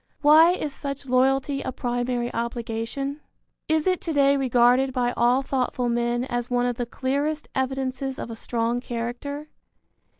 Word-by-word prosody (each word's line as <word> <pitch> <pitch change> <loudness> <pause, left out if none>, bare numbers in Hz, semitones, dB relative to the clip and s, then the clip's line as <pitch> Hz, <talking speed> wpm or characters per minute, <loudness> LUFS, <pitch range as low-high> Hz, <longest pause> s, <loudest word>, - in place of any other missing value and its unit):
Why 315 +4 +7
is 300 -6 -3
such 275 0 -6
loyalty 270 +2 +2
a 260 - -3
primary 245 0 -2
obligation? 235 +4 -3 0.5
Is 315 -1 +1
it 370 -1 +1
to 330 - -3
day 280 -1 +4
regarded 255 0 +3
by 245 -1 0
all 245 +3 +3
thoughtful 250 -2 -1
men 240 +1 0
as 240 -1 -3
one 245 0 +1
of 245 -1 -1
the 245 - -2
clearest 285 +5 -2
evidences 265 0 -2
of 230 - -6
a - - -5
strong 230 +1 -1
character? 250 +5 -5
255 Hz, 155 wpm, -25 LUFS, 240-275 Hz, 0.5 s, Why